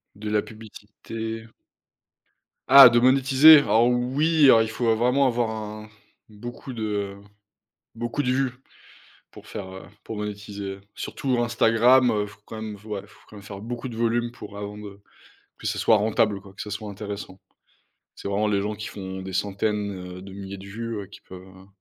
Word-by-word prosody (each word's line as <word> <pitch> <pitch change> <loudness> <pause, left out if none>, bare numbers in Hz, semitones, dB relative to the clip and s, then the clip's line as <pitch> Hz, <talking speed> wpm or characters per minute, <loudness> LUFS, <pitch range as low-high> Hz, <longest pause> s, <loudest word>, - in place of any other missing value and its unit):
De 105 +1 -6
la 105 -1 +2
publicité. 110 +1 -8 1.2
Ah, 135 -1 +11
de 120 0 +3
monétiser? 135 +4 +7
Alors 120 -4 +3
oui, 140 +6 +2
alors 115 -4 +7
il 110 - -1
faut 115 0 +1
vraiment 125 +4 +2
avoir 120 -2 0
un 110 -1 -7 0.4
beaucoup 120 +4 -9
de 105 -3 -3 0.8
beaucoup 120 +5 -3
de 125 - 0
vues, 130 -1 0 0.8
pour - - -14
faire, 100 -3 -7
heu 95 - -9 0.2
pour 110 - -6
monétiser, 100 -1 -6 0.2
surtout 130 -3 -2
Instagram, 120 +2 +4
heu, 105 -1 0
faut 105 0 -15
quand 110 - -8
même, 105 -2 -6
f 105 - -21
ouais, 105 -3 -5
faut - - -21
quand 105 - -13
même 100 - -11
faire 100 -1 -9
beaucoup 120 +3 -5
de 115 - -8
volume 120 +1 0
pour 105 -4 -11
avant 105 0 -6
de 100 -1 -10 0.6
que - - -7
ce - - -1
soit 110 - +4
rentable, 105 -1 +1
quoi, 95 -1 -15
que - - -12
ce 105 - -8
soit 105 0 -5
intéressant. 100 -2 -7 0.7
C'est - - -7
vraiment 105 +2 0
les 100 -1 +1
gens 105 +1 -3
qui 110 +1 -7
font 95 -1 -7
des 95 0 -7
centaines, 100 +1 -1 0.3
heu, - - -10
de 95 0 -11
milliers 100 0 -8
de 95 - -11
vues, 115 +2 -5
heu, - - -10
qui 100 - -14
peuvent, 90 -1 -12
heu 95 0 -16
110 Hz, 185 wpm, -24 LUFS, 100-120 Hz, 1.2 s, Ah